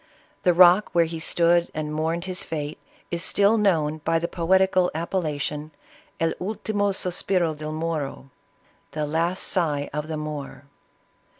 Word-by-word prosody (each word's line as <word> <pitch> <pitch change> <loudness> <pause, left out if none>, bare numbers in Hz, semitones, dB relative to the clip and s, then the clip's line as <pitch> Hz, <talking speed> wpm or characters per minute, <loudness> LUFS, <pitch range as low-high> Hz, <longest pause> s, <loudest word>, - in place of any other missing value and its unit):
The 180 - +4
rock 180 +3 +6
where 170 -1 +4
he 165 0 -5
stood 170 +1 +2
and 150 0 -3
mourned 165 +3 -1
his 185 -1 -4
fate, 150 -2 -5 0.3
is 170 0 0
still 205 +2 +4
known 160 -8 +1
by 165 +2 +1
the 170 +1 -1
poetical 185 +1 +2
appellation 155 -3 -2 0.5
of 165 0 +1
El 180 - -4
ultimo 205 -1 -1
sospiro 180 -3 0
delmoro, 155 -3 -4 0.3
" - - -37
The 155 -1 -2
last 165 +5 0
sigh 150 -5 0
of 150 +1 -3
the 155 -1 -4
Moor." 150 -2 -6
165 Hz, 145 wpm, -24 LUFS, 155-180 Hz, 0.5 s, rock